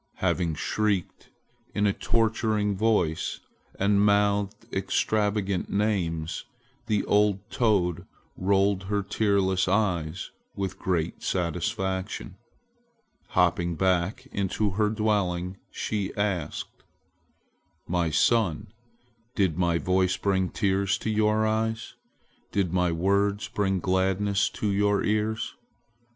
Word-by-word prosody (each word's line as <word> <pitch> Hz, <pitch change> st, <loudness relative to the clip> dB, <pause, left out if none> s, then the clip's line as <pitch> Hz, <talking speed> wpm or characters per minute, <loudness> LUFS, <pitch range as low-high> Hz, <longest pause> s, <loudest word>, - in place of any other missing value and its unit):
Having 85 Hz, -3 st, 0 dB
shrieked 100 Hz, +2 st, -1 dB, 0.5 s
in 105 Hz, -, +2 dB
a 100 Hz, -, +3 dB
torturing 110 Hz, -3 st, +1 dB
voice 95 Hz, -7 st, +1 dB, 0.4 s
and 100 Hz, +1 st, +3 dB
mouthed 100 Hz, -1 st, +2 dB
extravagant 105 Hz, -3 st, 0 dB
names, 90 Hz, -6 st, -1 dB, 0.4 s
the 105 Hz, -2 st, +1 dB
old 105 Hz, -1 st, +2 dB
toad 95 Hz, -7 st, +1 dB, 0.3 s
rolled 95 Hz, 0 st, +2 dB
her 100 Hz, +1 st, -1 dB
tearless 100 Hz, -2 st, +1 dB
eyes 90 Hz, -6 st, 0 dB, 0.2 s
with 95 Hz, -1 st, -4 dB
great 85 Hz, -3 st, -1 dB
satisfaction. 95 Hz, +3 st, -2 dB, 0.9 s
Hopping 85 Hz, -1 st, +1 dB
back 95 Hz, +8 st, 0 dB
into 100 Hz, +1 st, -1 dB
her 105 Hz, +2 st, +1 dB
dwelling, 100 Hz, -4 st, 0 dB
she 100 Hz, -3 st, -3 dB
asked: 100 Hz, -7 st, -3 dB, 1.0 s
"My 85 Hz, -1 st, +1 dB
son, 95 Hz, +3 st, +1 dB, 0.6 s
did 95 Hz, -6 st, +2 dB
my 85 Hz, -1 st, +2 dB
voice 95 Hz, +1 st, +1 dB
bring 95 Hz, -2 st, +1 dB
tears 100 Hz, -2 st, +1 dB
to 110 Hz, -, -2 dB
your 110 Hz, 0 st, +2 dB
eyes? 110 Hz, +1 st, -1 dB, 0.6 s
Did 95 Hz, -4 st, 0 dB
my 90 Hz, -1 st, +2 dB
words 100 Hz, +4 st, +1 dB
bring 95 Hz, -2 st, 0 dB
gladness 95 Hz, +2 st, +1 dB
to 105 Hz, -, -2 dB
your 100 Hz, 0 st, +2 dB
ears? 110 Hz, +1 st, 0 dB
100 Hz, 105 wpm, -27 LUFS, 90-105 Hz, 1.0 s, a